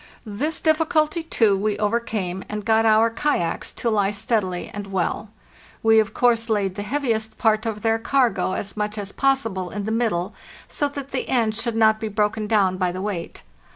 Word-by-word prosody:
This 275 Hz, +10 st, -2 dB
difficulty, 315 Hz, 0 st, +2 dB
too, 225 Hz, -10 st, +2 dB
we 205 Hz, +1 st, -1 dB
overcame, 210 Hz, -4 st, -2 dB
and 210 Hz, -1 st, -5 dB
got 225 Hz, 0 st, +3 dB
our 220 Hz, +1 st, +4 dB
kayaks 225 Hz, -, -1 dB
to 235 Hz, -, -1 dB
lie 205 Hz, -2 st, +2 dB
steadily 205 Hz, -3 st, -1 dB
and 205 Hz, -1 st, -6 dB
well. 195 Hz, +2 st, -2 dB, 0.5 s
We 225 Hz, 0 st, +6 dB
of 215 Hz, -1 st, +1 dB
course 235 Hz, -2 st, +2 dB
laid 200 Hz, -4 st, +1 dB
the 205 Hz, -, -5 dB
heaviest 220 Hz, -2 st, -2 dB
part 220 Hz, -1 st, +2 dB
of 210 Hz, -2 st, -4 dB
their 225 Hz, 0 st, +2 dB
cargo 245 Hz, -5 st, +1 dB
as 195 Hz, +1 st, -5 dB
much 210 Hz, 0 st, -3 dB
as 200 Hz, -1 st, -5 dB
possible 225 Hz, -10 st, 0 dB
in 205 Hz, +2 st, -5 dB
the 220 Hz, -, -3 dB
middle, 215 Hz, -5 st, 0 dB, 0.3 s
so 290 Hz, -, -1 dB
that 280 Hz, -1 st, -7 dB
the 260 Hz, -, -3 dB
ends 225 Hz, -4 st, +1 dB
should 235 Hz, -2 st, -1 dB
not 220 Hz, -1 st, +4 dB
be 220 Hz, -, -3 dB
broken 210 Hz, +1 st, -1 dB
down 195 Hz, -4 st, +2 dB
by 180 Hz, -1 st, 0 dB
the 185 Hz, -, -6 dB
weight. 190 Hz, -4 st, -5 dB
220 Hz, 190 wpm, -23 LUFS, 205-230 Hz, 0.5 s, We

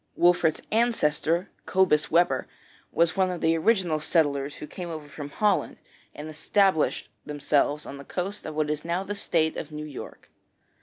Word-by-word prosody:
Wolfert's 175 Hz, -3 st, +3 dB
ancestor, 180 Hz, -7 st, +1 dB, 0.2 s
Cobus 185 Hz, -5 st, +3 dB
Webber, 165 Hz, -6 st, +2 dB, 0.4 s
was 170 Hz, 0 st, +2 dB
one 190 Hz, -1 st, +2 dB
of 180 Hz, -1 st, -3 dB
the 165 Hz, 0 st, +2 dB
original 175 Hz, -3 st, +2 dB
settlers 145 Hz, -3 st, +1 dB
who -, -, -8 dB
came 175 Hz, +3 st, -7 dB
over 155 Hz, -3 st, -7 dB
from 145 Hz, 0 st, -8 dB
Holland 205 Hz, +6 st, +1 dB, 0.4 s
and 150 Hz, -, -7 dB
established 160 Hz, +2 st, +1 dB, 0.2 s
themselves 145 Hz, 0 st, 0 dB
on 140 Hz, -, -8 dB
the 140 Hz, -, -9 dB
coast 190 Hz, +7 st, -4 dB
of 155 Hz, -, -6 dB
what 150 Hz, -1 st, 0 dB
is 150 Hz, 0 st, -3 dB
now 170 Hz, +3 st, -1 dB
the 205 Hz, -, -4 dB
State 165 Hz, -5 st, 0 dB
of 155 Hz, -, -6 dB
New 150 Hz, 0 st, -6 dB
York. 145 Hz, -4 st, -9 dB
160 Hz, 165 wpm, -26 LUFS, 150-180 Hz, 0.4 s, Wolfert's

